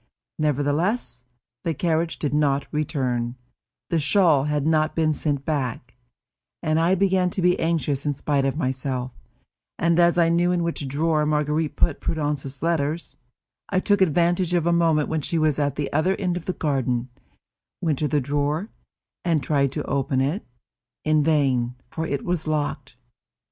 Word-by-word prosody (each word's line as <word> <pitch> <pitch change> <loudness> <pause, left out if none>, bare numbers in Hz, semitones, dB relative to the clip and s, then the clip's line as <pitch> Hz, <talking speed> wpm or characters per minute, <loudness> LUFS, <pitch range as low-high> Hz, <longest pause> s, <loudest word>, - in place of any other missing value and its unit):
Nevertheless, 150 - 0 0.4
the 165 -2 -1
carriage 165 +1 0
did 145 -2 -2
not 145 -2 +2
return, 130 -6 -1 0.6
the 165 - +2
shawl 155 -3 +3
had 150 -1 0
not 155 -1 +2
been 155 -1 +2
sent 145 -2 -2
back, 125 -5 -2 0.7
and 155 0 +2
I 170 +3 +3
began 190 -1 +2
to 185 - -2
be 180 0 +3
anxious 155 -4 0
in 145 -1 -1
spite 140 0 0
of 135 +1 0
myself, 130 -3 -2 0.7
and 170 +1 +2
as 170 0 +4
I 170 -1 +4
knew 175 +1 +2
in 175 -1 +1
which 165 -4 -3
drawer 155 +3 +1
Marguerite 150 +1 0
put - - +1
Prudence's 145 -3 -3
letters, 165 -1 -1 0.5
I 185 - +2
took 205 +1 +2
advantage 175 +1 +2
of 170 -2 +1
a 170 - +3
moment 165 -3 +2
when 160 -1 -1
she 165 - -1
was 155 -2 +2
at 145 -2 0
the 145 -2 -3
other 155 +6 +2
end 180 -3 -1
of 175 - -5
the 185 - -1
garden, 130 -6 -1 0.7
went 155 -5 0
to 150 - +1
the 150 0 +1
drawer, 145 - -1 0.5
and 165 -5 +1
tried 140 -2 +1
to 150 - -2
open 135 0 0
it; 145 +10 0 0.6
in 155 -1 +3
vain, 135 -6 +1 0.2
for 160 0 -3
it 140 - -3
was 175 -3 -1
locked. 145 -4 -2
155 Hz, 165 wpm, -24 LUFS, 140-170 Hz, 0.7 s, as